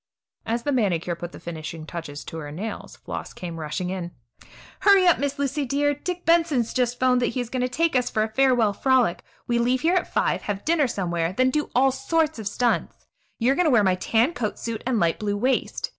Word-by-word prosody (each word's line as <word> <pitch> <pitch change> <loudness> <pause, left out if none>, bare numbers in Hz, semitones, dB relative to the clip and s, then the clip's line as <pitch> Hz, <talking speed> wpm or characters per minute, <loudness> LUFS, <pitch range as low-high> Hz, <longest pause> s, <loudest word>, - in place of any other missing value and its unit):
As 235 +1 -1
the 290 - 0
manicure 185 - 0
put 170 +1 -7
the - - -11
finishing 160 -1 -7
touch 155 -4 -7
to 165 - -7
her 145 -2 -7
nails, 205 +9 -6
Floss - - -7
came 170 -2 -7
rushing 160 +4 -3
in: 180 -2 -4 0.7
"Hurry 395 -2 +5
up, 350 - +5
Miss 285 0 -2
Lucy 280 +1 -1
dear! 285 +2 +1
Dick 355 +5 -5
Benson 330 -3 +3
has 235 -2 -1
just 245 -1 0
'phoned 255 -1 +3
that 240 - +2
he - - +1
is 245 -2 -4
going 255 - -1
to 250 - 0
take 330 +3 0
us 250 -1 +2
for 215 - +1
a - - -1
farewell 245 -5 +3
frolic. 255 -5 +2 0.2
We 235 0 +1
leave 250 +2 +1
here 335 +3 +2
at 365 -1 0
five, - - +1
have 205 -1 -4
dinner 315 -4 +3
somewhere, 175 -5 -2
then 255 +5 +2
do 300 +2 -1
all 265 +2 +4
sorts 320 - 0
of 215 - -4
stunts. 235 +3 -1 0.3
You 245 +3 +2
are - - +2
going 360 - +2
to - - +4
wear 225 -4 +5
my 190 -2 +3
tan 225 - +1
coat 225 -7 -3
suit 230 -2 -4
and 250 -4 +1
light 170 -3 +1
blue 205 -1 -1
waist. 255 +5 -1
240 Hz, 235 wpm, -24 LUFS, 190-275 Hz, 0.7 s, Hurry